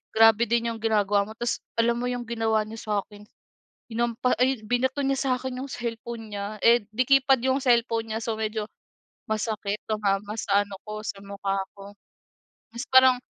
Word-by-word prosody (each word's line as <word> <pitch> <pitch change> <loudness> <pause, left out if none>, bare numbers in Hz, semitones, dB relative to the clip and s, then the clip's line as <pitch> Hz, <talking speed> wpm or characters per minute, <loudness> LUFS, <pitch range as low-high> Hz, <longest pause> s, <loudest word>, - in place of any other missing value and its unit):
grabe 225 +1 +6
din 235 0 +1
'yong 225 - -7
ginagawa 205 -2 +2
mo." 220 - -10
Tapos 240 -1 -1 0.2
alam 235 +1 +3
mo 245 - -1
'yong 245 -1 -2
ginawa 225 -2 +1
niya 225 +1 -8
sa'kin 210 0 -4 0.6
hinampa 235 +2 0
ay, 255 -3 +2
binato 260 +4 0
niya 270 0 +1
sa'kin 255 -1 -1
'yong 275 - -5
cellphone 230 -2 -5
niya, 205 +1 -4
eh, 235 -2 +5
de-keypad 265 +1 +4
'yong 265 +1 +2
cellphone 235 -3 +2
niya. 220 - -1
So, 225 -2 -1
medyo 215 0 -2 0.6
masakit, 215 -1 -2
tumama 210 -1 0
sa 200 0 +2
ano 200 - -9
ko, 215 0 -5
sa 200 - -4
mukha 200 0 -2 0.2
ko. 200 0 -11 0.8
Tapos 235 +3 -5
parang 260 -1 +8
225 Hz, 165 wpm, -26 LUFS, 210-245 Hz, 0.8 s, parang